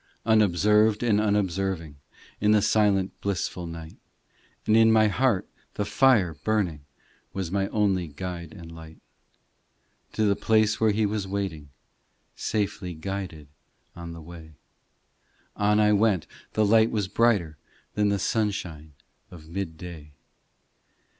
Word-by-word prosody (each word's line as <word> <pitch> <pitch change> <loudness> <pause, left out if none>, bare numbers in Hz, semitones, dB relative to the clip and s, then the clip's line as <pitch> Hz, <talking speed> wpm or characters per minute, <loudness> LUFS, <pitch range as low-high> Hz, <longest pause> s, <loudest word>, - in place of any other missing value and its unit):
Unobserved 105 +1 +3
and 105 -3 +3
unobserving 95 -6 -1 0.4
In 105 +1 +3
the 105 -2 +3
silent 105 -3 +2
blissful 90 -2 -3
night; 80 -1 -9 0.7
And 110 - +3
in 115 0 +6
my 110 -1 +5
heart 115 -3 +1 0.3
the 105 - -1
fire 110 -8 +3
burning 90 -10 -1 0.5
Was 95 -4 -4
my 95 0 0
only 100 -5 0
guide 85 +2 -7
and 85 -1 -11
light. 80 -1 -12 1.2
To 110 - +1
the 100 -1 +3
place 110 0 +2
where 110 - +4
He 105 +1 +1
was 105 -1 -2
waiting, 95 -7 -4 0.7
Safely 100 -4 -3
guided 85 -3 -6 0.5
on 85 -1 -8
the 85 - -10
way 80 -2 -12 1.0
On 105 +1 +2
I 105 0 +4
went; 105 -4 +2 0.3
the 110 - +2
light 110 +2 +4
was 105 -4 -1
brighter 95 -9 +1 0.3
Than 105 -1 +1
the 100 - +1
sunshine 90 -8 -2 0.4
of 80 -3 -13
mid 85 -2 -5
day. 80 -4 -10
100 Hz, 130 wpm, -26 LUFS, 85-105 Hz, 1.2 s, in